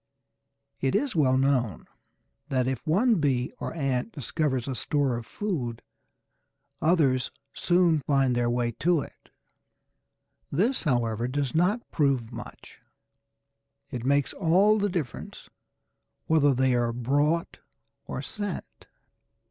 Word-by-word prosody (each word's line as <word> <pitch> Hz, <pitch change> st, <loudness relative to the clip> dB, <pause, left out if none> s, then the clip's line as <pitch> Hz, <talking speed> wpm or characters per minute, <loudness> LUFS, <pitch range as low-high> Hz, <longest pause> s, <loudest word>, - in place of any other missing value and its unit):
It 135 Hz, -1 st, 0 dB
is 275 Hz, -5 st, 0 dB
well 130 Hz, -5 st, +3 dB
known 130 Hz, -, +1 dB, 0.6 s
that 130 Hz, -2 st, +1 dB
if 130 Hz, +4 st, -3 dB
one 210 Hz, +6 st, +3 dB
bee 130 Hz, -4 st, 0 dB
or -, -, -4 dB
ant 135 Hz, -, -1 dB
discovers 140 Hz, -, -2 dB
a 135 Hz, -, -2 dB
store 135 Hz, 0 st, 0 dB
of 120 Hz, 0 st, -6 dB
food, 130 Hz, -, -3 dB, 1.0 s
others 150 Hz, -6 st, +2 dB, 0.2 s
soon 175 Hz, -3 st, +3 dB
find 135 Hz, -3 st, +3 dB
their 120 Hz, 0 st, +1 dB
way 120 Hz, 0 st, 0 dB
to 170 Hz, -2 st, +3 dB
it. -, -, -12 dB, 1.2 s
This, 210 Hz, -, +1 dB
however, 120 Hz, -4 st, 0 dB
does 135 Hz, -1 st, -2 dB
not 185 Hz, +8 st, +1 dB
prove 135 Hz, -6 st, +1 dB
much. -, -, -10 dB, 1.1 s
It 120 Hz, -2 st, -4 dB
makes 140 Hz, +1 st, +1 dB
all 195 Hz, +5 st, +3 dB
the 205 Hz, 0 st, +1 dB
difference 170 Hz, -, -5 dB, 0.7 s
whether 145 Hz, -4 st, +3 dB
they 130 Hz, 0 st, +2 dB
are 120 Hz, -1 st, +1 dB
brought 145 Hz, +7 st, 0 dB, 0.5 s
or 130 Hz, -, -4 dB
sent. 205 Hz, +3 st, -6 dB
140 Hz, 120 wpm, -27 LUFS, 125-170 Hz, 1.2 s, well